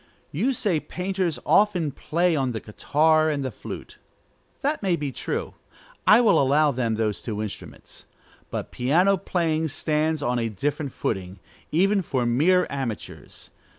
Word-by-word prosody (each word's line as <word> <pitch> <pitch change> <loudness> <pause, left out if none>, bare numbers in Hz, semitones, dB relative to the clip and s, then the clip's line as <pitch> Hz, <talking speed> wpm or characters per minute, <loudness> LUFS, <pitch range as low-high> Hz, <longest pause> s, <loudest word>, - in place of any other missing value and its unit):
You 220 - +1
say 195 -9 0
painters 180 -2 -2
often 180 -8 +3
play 170 +4 0
on 130 -4 0
the 110 - -3
guitar 155 +9 +2
and 145 -3 -1
the 130 - -3
flute. - - -9 0.6
That 295 +2 -1
may 190 -4 +2
be 145 -4 -3
true: - - -4 0.5
I 220 +3 +8
will 220 -9 +4
allow 145 +2 +3
them 120 -3 -1
those 110 -2 -1
two 105 -3 -4
instruments. 105 -2 -8 0.4
But - - -5
piano 170 +11 +3
playing 165 -4 -1
stands 155 +1 -1
on 125 -1 0
a 115 -1 -1
different 140 - -2
footing, 95 -4 -3 0.3
even 195 +5 +3
for 130 -7 -1
mere 165 +10 +3
amateurs. 130 -6 -6
150 Hz, 150 wpm, -24 LUFS, 125-180 Hz, 0.6 s, I